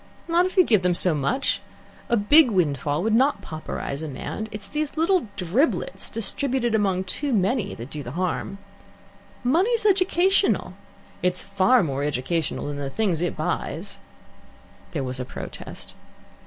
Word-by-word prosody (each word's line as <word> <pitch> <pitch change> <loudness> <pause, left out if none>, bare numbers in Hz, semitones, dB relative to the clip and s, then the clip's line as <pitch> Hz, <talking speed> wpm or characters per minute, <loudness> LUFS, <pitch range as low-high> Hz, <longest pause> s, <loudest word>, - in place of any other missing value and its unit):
"Not 345 +2 +3
if 370 - -9
you 370 - +8
gave 215 - +3
them 180 -1 +1
so 180 -1 +7
much. 155 - 0 0.5
A 235 - +3
big 260 +7 +6
windfall 150 - 0
would 220 +1 +1
not 265 +5 +2
pauperize 155 -2 -5
a 160 - -4
man. 155 +10 -5
It 210 - -6
is 200 - -7
these 305 0 -3
little 335 - +2
driblets, 195 - 0
distributed 240 +1 0
among 195 -4 +1
too 275 +10 -1
many, 205 0 0
that 120 +4 -9
do 150 - -5
the 125 - -7
harm. 185 +3 -2 0.9
Money's 385 - +2
educational. 385 -1 +2 0.5
It's 180 0 0
far 200 +4 +3
more 140 -3 -2
educational 150 +3 -2
than 145 0 -4
the 140 -1 -4
things 180 0 0
it 175 - -2
buys." - - -3 0.9
There 140 - -3
was 130 0 -5
a - - -2
protest. - - -8
200 Hz, 155 wpm, -24 LUFS, -, 0.9 s, you